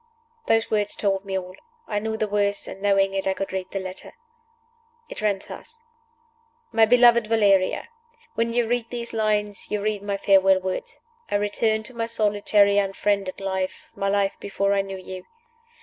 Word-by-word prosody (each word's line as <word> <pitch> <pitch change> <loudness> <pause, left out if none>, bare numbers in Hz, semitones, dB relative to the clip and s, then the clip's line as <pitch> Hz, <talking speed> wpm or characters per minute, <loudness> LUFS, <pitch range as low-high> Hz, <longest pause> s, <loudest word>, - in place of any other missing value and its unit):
Those 225 0 +2
words 210 -1 0
told 195 -1 -1
me 190 -1 -2
all. 185 0 -6 0.3
I 205 - -1
knew 220 +1 -3
the 215 - -1
worst; 205 0 0
and, 195 - -8
knowing 195 -1 +2
it, 195 0 -2
I 190 - +1
could 195 0 -4
read 185 -1 -3
the - - -4
letter. 185 0 -7 1.0
It - - -7
ran 205 -2 +1
thus: 465 0 -12 0.9
"MY 225 - +5
BELOVED 240 -1 +5
VALERIA 200 -4 +2 0.5
When 230 0 0
you 235 -1 +1
read 240 0 -1
these 235 -1 -6
lines 210 -2 -1
you 210 - -1
read 210 0 -1
my 200 -1 -2
farewell 195 -1 +4
words. 185 0 -5 0.3
I - - -1
return 220 +2 0
to 235 - -8
my 230 -1 -2
solitary 205 -2 +3
unfriended 195 -1 -1
life 190 -1 -3
my 195 0 -2
life 200 -1 +1
before 200 0 0
I 200 - +2
knew 195 -1 -6
you. 185 0 -9
205 Hz, 175 wpm, -24 LUFS, 195-220 Hz, 1.0 s, MY